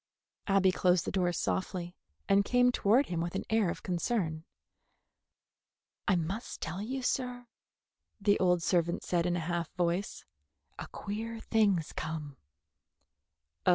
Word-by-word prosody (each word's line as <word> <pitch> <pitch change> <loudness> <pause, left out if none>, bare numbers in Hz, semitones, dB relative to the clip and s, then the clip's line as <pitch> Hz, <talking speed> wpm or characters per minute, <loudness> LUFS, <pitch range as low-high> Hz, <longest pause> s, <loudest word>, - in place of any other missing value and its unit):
Abby 195 -2 +4
closed 180 -1 +2
the - - -2
door 180 -2 +1
softly, 180 0 -2 0.3
and 200 0 +5
came 245 +3 +4
toward 245 +4 +3
him 170 -2 -2
with 170 +2 -3
an 195 - -1
air 220 -4 +3
of - - -5
concern. 175 -3 -1 1.6
"I 200 - +4
must 180 +7 -3
tell 175 +4 -4
you, 260 +5 -3
sir," 250 -1 -1 0.7
the 205 0 +3
old 180 -2 +3
servant 170 -1 +1
said 175 -1 +1
in 175 - +1
a - - 0
half 170 0 -2
voice, 180 +2 -1 0.5
"a - - -5
queer 225 +3 -5
thing's 205 -8 +1
come." 150 -3 -5
185 Hz, 135 wpm, -31 LUFS, 170-215 Hz, 1.6 s, and